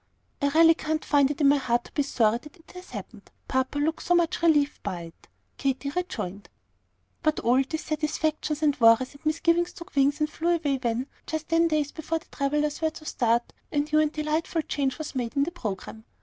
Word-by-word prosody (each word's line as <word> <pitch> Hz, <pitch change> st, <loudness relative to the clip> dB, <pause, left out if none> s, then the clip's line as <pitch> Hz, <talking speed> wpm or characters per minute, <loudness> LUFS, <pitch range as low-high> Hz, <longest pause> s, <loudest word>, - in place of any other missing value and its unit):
"I 285 Hz, -, +3 dB
really 325 Hz, +3 st, +6 dB
can't 315 Hz, -1 st, -3 dB
find 285 Hz, -2 st, +4 dB
it 295 Hz, +1 st, -3 dB
in 285 Hz, -, +6 dB
my 285 Hz, +1 st, +5 dB
heart 240 Hz, -3 st, 0 dB
to -, -, -15 dB
be 290 Hz, -, 0 dB
sorry 235 Hz, -5 st, +2 dB
that 300 Hz, +2 st, -15 dB
it 330 Hz, -, -19 dB
has 360 Hz, 0 st, -11 dB
happened, -, -, -9 dB, 0.2 s
papa 260 Hz, +2 st, 0 dB
looks 310 Hz, +2 st, -1 dB
so 355 Hz, -, +4 dB
much 345 Hz, 0 st, +1 dB
relieved 295 Hz, -4 st, +3 dB
by 175 Hz, -2 st, -4 dB
it," 165 Hz, 0 st, -14 dB, 0.3 s
Katy 275 Hz, +1 st, -1 dB
rejoined. 210 Hz, -, -4 dB, 0.7 s
But 310 Hz, 0 st, +1 dB
all 250 Hz, +3 st, +4 dB
dissatisfactions 310 Hz, +1 st, -2 dB
and 290 Hz, -2 st, +3 dB
worries 230 Hz, +3 st, +5 dB
and 285 Hz, -, -17 dB
misgivings 335 Hz, +2 st, +2 dB
took 340 Hz, -4 st, -11 dB
wings 280 Hz, +2 st, +3 dB
and 305 Hz, -, +2 dB
flew 340 Hz, +3 st, 0 dB
away 290 Hz, -5 st, 0 dB
when, 240 Hz, +1 st, -1 dB, 0.2 s
just 315 Hz, -1 st, -4 dB
ten 330 Hz, 0 st, +4 dB
days 305 Hz, -3 st, 0 dB
before 320 Hz, +1 st, -3 dB
the 325 Hz, -, -11 dB
travellers 295 Hz, +2 st, 0 dB
were 320 Hz, -, +2 dB
to 310 Hz, 0 st, -12 dB
start, 235 Hz, -4 st, 0 dB, 0.2 s
a -, -, -3 dB
new 305 Hz, +1 st, +2 dB
and 305 Hz, -1 st, +2 dB
delightful 310 Hz, +1 st, -1 dB
change 275 Hz, -3 st, -1 dB
was 310 Hz, -1 st, -6 dB
made 245 Hz, -1 st, -3 dB
in 280 Hz, -, +3 dB
the 330 Hz, -, -2 dB
programme. 220 Hz, -, -6 dB
295 Hz, 205 wpm, -26 LUFS, 270-315 Hz, 0.7 s, really